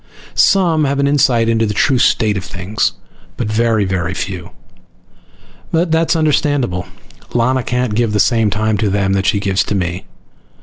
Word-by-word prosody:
Some 170 -6 +3
have 140 0 -1
an 140 - +1
insight 135 -5 +2
into 115 -1 +1
the 105 - -3
true 130 +3 +2
state 110 -3 +2
of 95 - -4
things, 95 +3 -2 0.4
but 120 - -2
very 110 -1 +1
very 90 -1 -2
few. 90 -4 -5 1.2
But 165 0 0
that 160 0 +1
is - - +3
understandable. 145 - 0 0.5
Lana 130 +2 +2
can't 125 -2 -2
give 115 0 0
the 105 - 0
same 115 -2 +2
time 110 +1 -1
to 105 - +1
them 95 0 0
that 95 0 0
she 100 - +2
gives 100 -1 0
to 105 - -2
me. 90 -1 -3
110 Hz, 175 wpm, -16 LUFS, 100-135 Hz, 1.2 s, Some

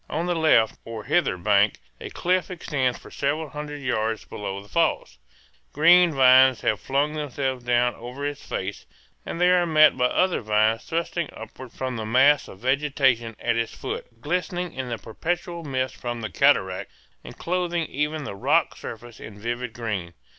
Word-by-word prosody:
On 165 +3 -2
the 180 - 0
left 155 -9 +3
or 115 -2 -7
hither 90 - +1
bank 100 +3 +2 0.2
a - - -7
cliff 185 +1 0
extends 145 -8 -1
for - - -14
several 150 +2 -2
hundred 150 -1 -7
yards 110 -5 -1
below 100 -1 -5
the 100 - -13
falls. 65 - 0 0.5
Green 175 +3 +6
vines 130 -2 +6
have 110 - +1
flung 140 +3 0
themselves 135 -4 -3
down 120 0 +2
over 125 +4 -7
its 145 0 -4
face, 95 +1 -5 0.4
and - - -4
they 180 0 +4
are 175 -1 +3
met 155 -1 +6
by 125 -1 +1
other 185 +7 +1
vines 110 +1 +1
thrusting 170 0 -2
upward 115 +3 -10
from 130 -1 -4
the 110 - -4
mass 135 +5 +4
of - - -11
vegetation 130 -4 +1
at 120 -1 0
its 115 -1 -2
foot, - - -5
glistening 180 +3 -2
in 130 -1 -5
the 120 - -3
perpetual 170 +9 -4
mist 130 -3 -2
from 120 -1 -5
the 110 - -5
cataract, 95 -10 +2 0.3
and - - -11
clothing 175 -1 -1
even 150 +2 -2
the 140 - -6
rock 100 - +1
surfaces 120 0 -9
in 105 -1 -10
vivid 120 +2 -3
green. 105 -7 -4
130 Hz, 175 wpm, -24 LUFS, 115-155 Hz, 0.5 s, Green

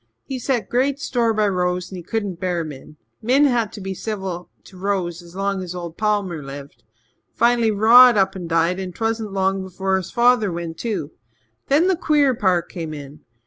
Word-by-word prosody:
He 265 -1 -5
set 245 -1 -1
great 270 +3 0
store 235 -5 0
by 215 -1 +1
Rose 180 -1 -1
and 190 - -6
he - - -6
c'dn't 200 -2 -3
bear 180 -2 -1
Min. 150 0 -10 0.2
Min 260 +6 +4
had 235 -6 +1
to 205 - -8
be 190 0 -4
civil 190 -4 -5
to 190 - -16
Rose 185 -3 -2
as 170 0 -15
long 195 0 -1
as 180 -1 -6
old 170 -2 -6
Palmer 205 -6 -1
lived. 140 0 -10 0.6
Fin'lly 235 -1 +3
Rod 230 +3 +7
up 195 -1 +2
and 175 -3 -6
died 165 +2 +1
and 185 -2 -6
'twasn't 225 -2 -2
long 195 0 0
before 190 +1 -1
his 185 - -5
father 240 -4 +3
went 170 -1 -5
too. 205 -10 -3 0.6
Then 295 +5 +4
the 380 - +3
queer 295 -5 +2
part 185 -6 +1
came 160 -3 -6
in. 145 +1 -10
195 Hz, 190 wpm, -21 LUFS, 175-230 Hz, 0.6 s, Rod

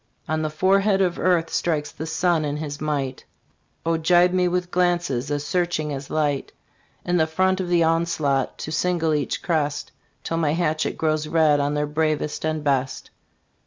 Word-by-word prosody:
On 155 0 -1
the 155 - -1
forehead 195 +5 +2
of 180 -3 +1
Earth 175 -3 +2
strikes 150 -3 -1
the 160 - -7
Sun 165 0 +1
in 145 0 -2
his 150 -1 -6
might, 140 -4 -2 0.6
Oh, 165 0 +1
gibe 175 +2 +4
me 180 -1 +2
with 180 0 -1
glances 175 -7 0
as 145 0 -2
searching 155 -2 -1
as 135 0 -6
light, 145 -3 -1 0.5
In 175 0 +1
the 160 -2 +3
front 185 +4 +1
of 180 - -4
the 175 -1 +3
onslaught 160 -5 0
to 155 - -6
single 165 -1 +1
each 145 -2 -2
crest, 145 -5 -1 0.3
Till 165 - -2
my 155 -3 +1
hatchet 160 -2 -1
grows 155 -1 0
red 155 -2 +3
on 145 +1 0
their 150 0 0
bravest 150 0 -1
and 155 -1 -1
best. 135 -2 -1
155 Hz, 175 wpm, -23 LUFS, 150-175 Hz, 0.6 s, gibe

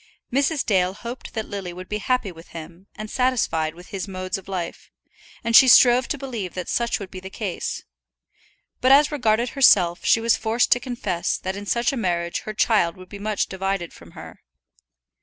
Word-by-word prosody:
Mrs. 280 +2 +1
Dale 185 -2 +1
hoped 240 +4 -8
that 220 -1 -3
Lily 195 -3 -5
would 185 +1 -9
be 210 - -3
happy 250 -3 -1
with 165 0 -14
him, 170 +4 -11
and 215 0 -6
satisfied 215 -11 0
with 175 +1 -14
his 195 -2 -5
modes 185 -1 -4
of 190 - -17
life, 180 -3 -5 0.5
and 230 0 +1
she 265 - +9
strove 245 0 +6
to 290 - -2
believe 235 -9 -6
that 180 -1 -5
such 235 0 0
would 195 -2 -8
be 185 - -7
the 190 +1 -9
case; 195 -2 -4 1.0
but 255 - +3
as 285 +2 +6
regarded 240 -4 +1
herself 185 -11 +4
she - - +4
was 230 0 +3
forced 225 +2 0
to 245 - +5
confess 210 -9 -2
that 190 +1 -4
in 205 0 -8
such 235 +4 +1
a - - -3
marriage 170 -5 -1
her 215 - -4
child 205 -7 +2
would 185 0 -13
be 200 - -9
much 210 0 -1
divided 190 -2 -3
from - - -16
her. - - -11
205 Hz, 195 wpm, -23 LUFS, 185-240 Hz, 1.0 s, she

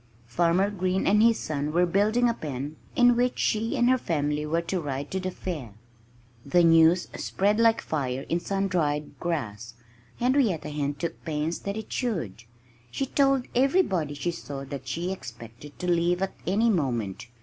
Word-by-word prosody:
Farmer 175 - +2
Green 185 -1 -1
and 210 +2 +4
his 230 0 +5
son 150 -1 -3
were 175 +2 +4
building 210 +7 +2
a 235 - +2
pen 145 - -5 0.2
in 245 -1 +5
which 245 +1 +1
she 220 +1 0
and 240 - +3
her 255 0 +4
family 150 -3 -1
were 165 +2 0
to 180 +1 -2
ride 140 -1 -4
to 190 - -1
the 185 0 -3
fair! 150 - -6 0.7
The 175 +5 +3
news 165 +1 +5
spread 205 +3 0
like 230 -1 +4
fire 135 -3 -2
in 170 - 0
sun 195 +2 -1
dried 150 -5 -1
grass. 120 -9 -4 0.4
Henrietta 245 - +1
Hen 145 -1 -2
took 165 +4 -5
pains 155 +1 -2
that 200 +1 -4
it 220 - -6
should. 160 - -3 0.4
She 270 - -2
told 275 -1 +2
everybody 240 - +2
she 175 +5 -2
saw 140 -5 -7
that 135 -1 -7
she 175 +3 -2
expected 120 -3 -10
to 180 - -4
leave 175 +1 +2
at 195 - -2
any 220 +5 +3
moment. 120 - -2
170 Hz, 170 wpm, -26 LUFS, 145-205 Hz, 0.7 s, his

